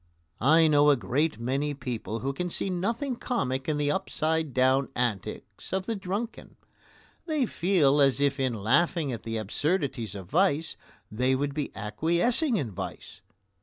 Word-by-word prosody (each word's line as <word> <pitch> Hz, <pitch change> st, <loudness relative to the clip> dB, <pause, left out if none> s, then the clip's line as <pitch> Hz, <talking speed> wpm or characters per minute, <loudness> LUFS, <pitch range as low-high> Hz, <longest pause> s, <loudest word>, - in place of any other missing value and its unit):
I 160 Hz, +6 st, +5 dB
know 150 Hz, -1 st, +5 dB
a 145 Hz, -, +6 dB
great 135 Hz, +7 st, -1 dB
many 140 Hz, +5 st, -1 dB
people 115 Hz, -5 st, -4 dB
who 135 Hz, +3 st, -2 dB
can 180 Hz, +5 st, -3 dB
see 190 Hz, -, -2 dB
nothing 230 Hz, +9 st, -1 dB
comic 135 Hz, -, -2 dB
in 150 Hz, -, 0 dB
the 145 Hz, 0 st, +1 dB
upside 160 Hz, -4 st, -1 dB
down 130 Hz, +2 st, +2 dB
antics 120 Hz, -6 st, -3 dB
of 190 Hz, 0 st, -1 dB
the 230 Hz, -, -2 dB
drunken; 200 Hz, +4 st, -5 dB, 0.7 s
they 305 Hz, -5 st, +1 dB
feel 165 Hz, -9 st, +2 dB
as 135 Hz, -1 st, +4 dB
if 140 Hz, 0 st, +1 dB
in 130 Hz, -3 st, 0 dB
laughing 145 Hz, -, +1 dB
at 115 Hz, -, -5 dB
the 115 Hz, 0 st, -4 dB
absurdities 130 Hz, -, -1 dB
of 95 Hz, -2 st, -7 dB
vice 160 Hz, -, +1 dB, 0.4 s
they 125 Hz, +4 st, +1 dB
would 140 Hz, +1 st, -1 dB
be 150 Hz, -1 st, -2 dB
acquiescing 175 Hz, -, +1 dB
in 125 Hz, -, -2 dB
vice. 95 Hz, -, -7 dB
145 Hz, 160 wpm, -27 LUFS, 130-180 Hz, 0.7 s, a